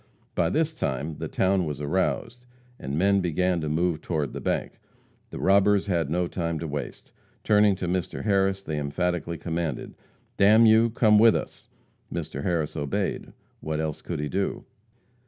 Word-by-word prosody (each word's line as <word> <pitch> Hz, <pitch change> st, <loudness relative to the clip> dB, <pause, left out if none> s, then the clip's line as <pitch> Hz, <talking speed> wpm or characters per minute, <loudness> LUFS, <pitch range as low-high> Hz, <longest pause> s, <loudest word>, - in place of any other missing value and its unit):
By 85 Hz, -2 st, +1 dB
this 160 Hz, -, 0 dB
time 75 Hz, -, -3 dB
the -, -, -3 dB
town 95 Hz, 0 st, +1 dB
was 75 Hz, -3 st, -4 dB
aroused, 95 Hz, +10 st, -2 dB, 0.3 s
and 70 Hz, +2 st, -4 dB
men 100 Hz, +3 st, +3 dB
began 90 Hz, 0 st, 0 dB
to 75 Hz, -, -2 dB
move 80 Hz, +1 st, 0 dB
toward 75 Hz, -5 st, -2 dB
the -, -, -6 dB
bank. -, -, -2 dB, 0.5 s
The -, -, -8 dB
robbers 100 Hz, +1 st, +3 dB
had 85 Hz, -7 st, 0 dB
no 90 Hz, +3 st, 0 dB
time 85 Hz, -2 st, -3 dB
to 80 Hz, +1 st, -4 dB
waste. 70 Hz, -3 st, -6 dB, 0.3 s
Turning 105 Hz, -2 st, +4 dB
to 90 Hz, -1 st, -4 dB
Mr. 90 Hz, 0 st, -2 dB
Harris, 95 Hz, -2 st, +1 dB
they 80 Hz, -5 st, -3 dB
emphatically 85 Hz, +3 st, -2 dB
commanded: 80 Hz, -3 st, -3 dB, 0.4 s
"D 100 Hz, -, +4 dB
n 110 Hz, +3 st, +7 dB
you, 110 Hz, +1 st, +5 dB
come 110 Hz, -2 st, +4 dB
with 115 Hz, 0 st, +6 dB
us!" -, -, -6 dB, 0.4 s
Mr. 80 Hz, -2 st, -4 dB
Harris 85 Hz, -6 st, -1 dB
obeyed. 70 Hz, -3 st, -2 dB, 0.3 s
What 80 Hz, 0 st, -3 dB
else 80 Hz, -1 st, -3 dB
could -, -, -5 dB
he 75 Hz, -, -2 dB
do? 95 Hz, +7 st, -2 dB
90 Hz, 170 wpm, -26 LUFS, 80-100 Hz, 0.5 s, n